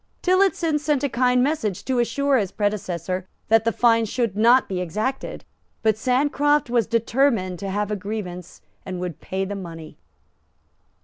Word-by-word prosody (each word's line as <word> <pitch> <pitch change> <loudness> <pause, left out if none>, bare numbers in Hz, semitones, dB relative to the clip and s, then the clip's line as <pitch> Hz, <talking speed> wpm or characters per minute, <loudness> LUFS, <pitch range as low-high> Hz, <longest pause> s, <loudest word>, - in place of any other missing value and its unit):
Tillotson 365 -4 +2
sent 295 -2 0
a 285 - +1
kind 250 0 +2
message 255 - -1
to 260 -2 0
assure 270 +4 +2
his 200 -3 -2
predecessor 185 -3 -2 0.2
that 225 0 +4
the 230 - +3
fine 230 -1 +3
should 225 -2 -2
not 235 +5 +5
be 185 -2 -3
exacted. 215 +10 -3 0.4
But 220 -2 +3
Sancroft 285 +3 +1
was 235 -4 +2
determined 230 -5 +1
to 195 - -4
have 205 +2 -2
a - - 0
grievance, 185 -3 -6 0.2
and 185 -2 -5
would 180 -4 -5
pay 190 +1 -3
the 200 - -5
money. 165 -5 -8
225 Hz, 160 wpm, -23 LUFS, 190-260 Hz, 0.4 s, not